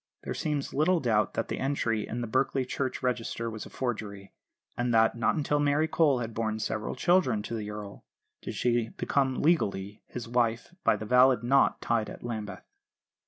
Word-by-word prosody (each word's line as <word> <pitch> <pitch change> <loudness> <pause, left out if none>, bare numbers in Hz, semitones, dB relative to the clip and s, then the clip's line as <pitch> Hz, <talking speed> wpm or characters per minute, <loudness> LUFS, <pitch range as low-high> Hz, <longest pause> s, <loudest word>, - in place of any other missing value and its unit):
There - - -3
seems 150 -3 -2
little 165 +5 +3
doubt 105 - +1
that - - -1
the - - -4
entry 120 -6 0
the - - -15
in 120 +2 -3
Berkeley 130 +3 0
church 130 +1 -3
register 115 -2 -2
was 110 -1 -7
a - - -13
forgery; 105 -6 -5 0.4
and 120 0 0
that, 110 +1 +4
not 115 - +1
until 145 -1 0
Mary 145 +2 +2
Cole 155 -4 +3
had 115 -1 -4
borne 110 -1 -1
several 110 +1 -3
children 130 - +2
to 115 - -6
the 105 -2 -4
Earl, 105 -1 -8 0.4
did - - -6
she 120 -2 +1
become 135 -2 0
legally 105 - +1
his 120 -2 -7
wife 120 +4 0
by - - +4
the 110 - -6
valid 125 0 +5
knot 135 +3 +3
tied 115 -2 0
at - - -10
Lambeth. 110 -5 -5
120 Hz, 185 wpm, -29 LUFS, 110-135 Hz, 0.4 s, valid